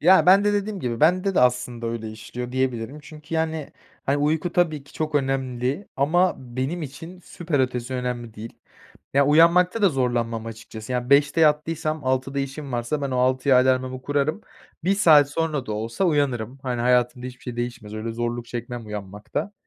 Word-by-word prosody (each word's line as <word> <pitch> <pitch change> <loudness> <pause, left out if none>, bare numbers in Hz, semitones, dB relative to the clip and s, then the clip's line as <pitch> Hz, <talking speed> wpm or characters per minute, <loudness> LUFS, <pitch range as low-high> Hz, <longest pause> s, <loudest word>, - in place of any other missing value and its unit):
Ya, 185 +3 +6
ben 195 +3 +7
de 205 - +3
dediğim 205 -1 -2
gibi 120 -4 -3
bende 185 +4 +3
de - - +4
aslında 125 -1 +1
öyle 115 -1 -4
işliyor 120 +3 -7
diyebilirim. 130 +1 -2
Çünkü 150 +2 -9
yani 160 -2 -2 0.3
hani 140 +1 +2
uyku 155 +4 0
tabii 155 -5 +1
ki - - -18
çok 155 -1 -3
önemli 135 +4 -1
ama 175 +7 +3
benim 130 +7 -4
için 165 +6 -9
süper 165 -4 -2
ötesi 125 0 -2
önemli 125 -3 -4
değil. 110 +2 -9 0.6
Ya, 140 0 +5
uyanmakta 175 +7 +5
da 200 - +7
zorlanmam 120 -5 -1
açıkçası. 110 +1 -8
Ya, 125 +1 -2
05.00'te 145 +3 +4
yattıysam 155 0 +1
06.00'da 130 +1 0
işim 140 0 -4
varsa 120 +5 -2
ben 140 - -1
o 125 - -1
06.00'ya 130 +1 +3
alarmımı 130 0 +1
kurarım. 145 +7 0 0.4
1 195 - +3
saat 155 -8 +6
sonra 150 -3 -1
da 110 - -3
olsa 115 - -2
uyanırım. 135 -6 0
Hani 125 -2 -2
hayatımda 125 0 +2
hiçbir 125 -1 -10
şey 120 -1 -6
değişmez. 120 -3 -5
Öyle 110 +1 -4
zorluk 120 0 -3
çekmem 120 -1 -6
uyanmakta. 105 - -5
130 Hz, 175 wpm, -24 LUFS, 120-155 Hz, 0.6 s, ben